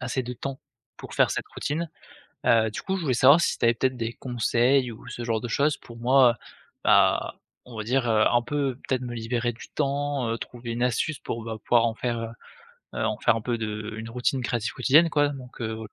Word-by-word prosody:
assez 130 +1 -2
de 125 - -5
temps 135 +3 -6 0.4
pour - - -9
faire - - +4
cette - - -3
routine, 160 +3 -2 0.6
heu, 110 -1 +4
du - - -5
coup 190 - -1
je - - -4
voulais 135 - +1
savoir 140 +7 +7
si - - +1
tu - - +1
avais 115 - +5
peut-être 130 +2 0
des 115 0 -3
conseils 125 +1 +1
ou 110 - -14
ce 120 - -6
genre 115 -2 0
de 120 - -4
chose 145 +4 +2
pour 115 - -13
moi, 125 +1 +5
heu, - - -13 0.5
bah, - - +4 0.3
on 125 - -12
va 110 - -3
dire, 120 +2 +1
heu, 110 -1 +4
un 120 - +4
peu 135 -1 -1
peut-être 130 -1 0
me 120 - -5
libérer 120 +1 -1
du 115 - -12
temps, 140 -2 -1
heu, 115 - -1
trouver 120 0 -7
une 120 +1 -1
astuce 125 +4 0
pour, 115 - -5
bah, 110 -1 -5
pouvoir 120 -1 +4
en 115 -1 -1
faire, 120 -1 -2 0.8
heu, - - -1
en - - -1
faire - - +3
un - - -5
peu 120 +2 -1
de 110 -1 -4
une 115 +1 -6
routine 125 +2 -1
créative 120 -2 -2
quotidienne, 150 +7 +5
quoi, 145 -1 +2
donc 130 -3 -9
heu 110 -1 -3
120 Hz, 230 wpm, -26 LUFS, 115-135 Hz, 0.8 s, savoir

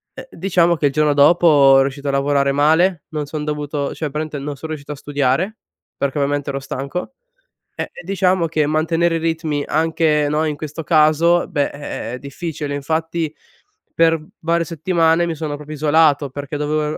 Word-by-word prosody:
eh, 260 0 -9
diciamo 175 -1 +2
che 145 - +2
il 135 - -2
giorno 150 -1 +2
dopo 160 +5 +5 0.3
ero 135 - +6
riuscito 140 +1 -4
a - - +2
lavorare 140 0 +1
male, 160 +4 +3
non 150 -2 -3
son 150 +1 -5
dovuto 150 -1 -3
cioè 155 -2 -4
praticamente 155 -1 -4
non 145 +1 -5
son 160 +4 -8
riuscito 150 -1 -6
a - - -9
studiare, 145 - -1 0.4
perché 140 +1 -2
ovviamente 145 0 -1
ero 135 0 -2
stanco, 140 - -5 0.6
e - - -4
diciamo 185 -1 +1
che 155 -2 0
mantenere 165 +2 +1
i 165 - 0
ritmi, 160 -3 -1
anche 155 -1 +1
no, 155 +1 +1
in 150 -1 -2
questo 155 +1 -6
caso 160 +2 +3
beh 145 -1 0
è 140 - -11
è 120 -4 -5
è 125 - -5
difficile, 145 0 -5
infatti 160 +2 -2 0.6
per 165 -1 +3 0.2
varie 170 +1 +1
settimane 165 +1 +1
mi 170 - -2
sono 150 -1 -4
proprio 150 +1 -8
isolato, 150 -1 +3
perché 145 +2 -6
dovevo 150 +1 -1
155 Hz, 180 wpm, -19 LUFS, 145-165 Hz, 0.6 s, ero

